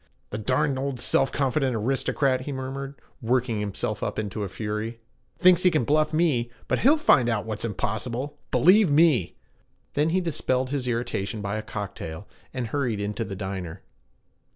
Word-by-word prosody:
'The 105 - -3
darned 130 +4 +1
old 135 -2 -3
self 135 - +2
confident 135 -2 0
aristocrat!' 130 +3 +1
he 145 - -4
murmured, 135 +1 -5 0.2
working 120 -1 +1
himself 105 -2 -3
up - - -3
into 105 0 -3
a 100 - -3
fury. 110 +3 -4 0.4
'Thinks 180 -1 +6
he 180 - +6
can 155 -7 +1
bluff 155 +4 +2
me, 155 -8 +1 0.2
but - - +1
he'll 290 +6 +5
find 130 - +4
out 110 -3 -1
what's 110 -2 -4
impossible, 115 +6 -3
believe 190 +2 +5
me!' 145 - +4 0.6
Then 150 +3 +2
he 180 +3 +2
dispelled 130 -7 -1
his 135 -3 -2
irritation 115 -4 -2
by 100 0 -3
a 110 - -2
cocktail 100 -4 -6 0.2
and 130 -2 -3
hurried 125 -6 -1
into 105 +3 -2
the 100 -3 -6
diner. 95 -2 -5
125 Hz, 165 wpm, -25 LUFS, 105-145 Hz, 0.6 s, Thinks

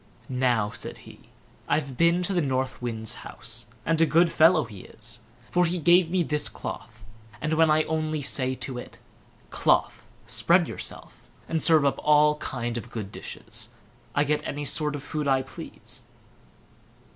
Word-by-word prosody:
"Now", 125 -5 +1
said - - -6
he, - - -15 0.4
"I've 140 -4 0
been 170 +4 +3
to 195 - -1
the 175 - +2
North 130 -3 -1
Wind's 110 -2 -2
house, - - -8 0.2
and 165 0 +2
a 165 - +6
good 165 +4 +4
fellow 160 0 +5
he 105 -4 -10
is, 115 +5 -4 0.3
for 180 - +4
he 175 +1 0
gave 175 +1 +5
me 180 0 +2
this 150 -1 -1
cloth, 105 0 -8 0.4
and 155 +1 -1
when 160 0 +5
I 155 +1 +4
only 155 -1 -1
say 130 -1 0
to 130 -1 -4
it, - - -10 0.5
'Cloth, - - +2 0.2
spread - - +3
yourself, - - -9 0.2
and 165 -1 -1
serve 155 -2 +5
up 140 - +1
all 150 0 +5
kind 120 -5 -3
of 110 - -11
good 105 -4 -5
dishes', - - -7 0.4
I 145 - +4
get 150 +1 +1
any 145 +1 -4
sort 150 +1 0
of 140 - -6
food 150 -2 -3
I 135 -1 +3
please." - - -6
150 Hz, 170 wpm, -26 LUFS, 130-160 Hz, 0.5 s, a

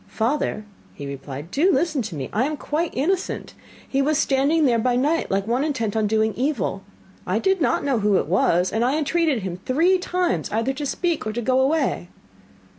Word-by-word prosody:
'Father,' 230 -2 -1 0.3
he 145 - -7
replied, 140 +3 -7
'do 345 +7 +3
listen 310 -2 +1
to 210 -7 -5
me. 135 -3 -4
I 225 +5 +2
am 305 +1 -3
quite 315 +4 -2
innocent. 360 +8 -1 0.3
He 275 - 0
was 300 +2 +1
standing 290 +2 +2
there 235 -3 +3
by 245 +2 +1
night 295 +6 +1
like 195 0 0
one 240 +5 0
intent 230 -9 -2
on 215 -1 +1
doing 220 0 +1
evil. 245 -8 -1 0.5
I 185 +4 +1
did 385 +8 +1
not 240 -5 +1
know 270 -5 +1
who 205 -2 +3
it - - 0
was, 180 +1 +2
and 220 +2 +1
I 260 +5 +1
entreated 310 - +1
him 180 -2 -4
three 340 +8 +3
times 360 -1 -1
either 230 +5 0
to 290 +1 -4
speak 340 - -1
or 215 - -2
to 240 - -2
go 255 +2 +2
away. 295 +4 0
260 Hz, 200 wpm, -23 LUFS, 215-305 Hz, 0.5 s, do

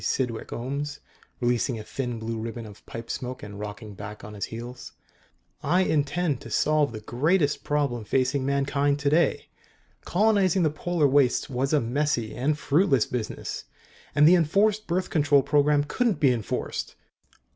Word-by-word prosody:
Cydwick 120 -4 -1
Ohms, 140 +4 -4 0.4
releasing 120 0 +1
a 110 - -6
thin 120 0 -4
blue 115 0 -4
ribbon 115 +1 -5
of 105 -2 -13
pipe 115 0 -7
smoke 125 0 -5
and 105 -1 -8
rocking 105 +1 -7
back 105 +2 -9
on 105 -2 -8
his 100 - -3
heels, 120 +2 -8 0.4
" - - -43
I 175 +6 +2
intend 155 -3 0
to - - -9
solve 150 -3 +2
the 110 -1 -7
greatest 145 - +1
problem 140 -6 0
facing 130 +3 +1
mankind 140 +1 +1
today. 150 +2 +1 0.5
Colonizing 195 -2 +3
the 155 - +2
Polar 165 -1 +1
Wastes 135 0 +2
was 130 +2 -1
a 150 - +4
messy 120 -2 -1
and 145 +4 0
fruitless 140 - +3
business. 120 -3 -4 0.5
And 150 0 +6
the 175 - +7
Enforced 200 +6 +2
Birth 180 +2 -1
Control 145 -3 +4
Program 145 0 +3
couldn't 220 +8 0
be 135 -4 +5
enforced. 115 -4 -3
140 Hz, 155 wpm, -26 LUFS, 120-150 Hz, 0.5 s, the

